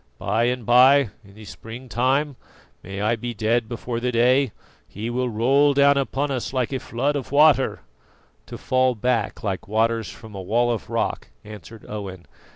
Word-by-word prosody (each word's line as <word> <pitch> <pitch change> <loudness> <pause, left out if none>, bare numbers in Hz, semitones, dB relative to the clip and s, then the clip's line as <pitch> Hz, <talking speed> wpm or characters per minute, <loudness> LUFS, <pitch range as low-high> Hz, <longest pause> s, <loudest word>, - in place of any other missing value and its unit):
By 115 +2 0
and 125 -1 -2
by, 130 0 +5
in 100 -1 -18
the 110 0 -12
spring 115 +5 -10
time 130 +5 0 0.5
may 95 +2 -7
I 110 +3 +1
be 120 +1 -6
dead 110 +2 0
before 120 0 -4
the 125 +1 -1
day 125 +2 +3 0.4
he 110 +4 -6
will 125 +1 -1
roll 135 +6 +3
down 140 0 +5
upon 140 +1 -1
us 130 -1 -3
like 130 0 -1
a 130 - -1
flood 135 +5 -2
of 140 -2 -5
water 145 -2 +4 0.3
" - - -36
"To - - -8
fall 130 -1 +1
back 115 -1 -1
like 95 -3 -3
waters 115 +1 0
from 110 -2 -12
a 95 - -6
wall 120 +6 +1
of 115 - -4
rock," - - -2 0.2
answered 105 +1 -12
Owen. 95 -4 -7
120 Hz, 180 wpm, -23 LUFS, 110-130 Hz, 0.5 s, by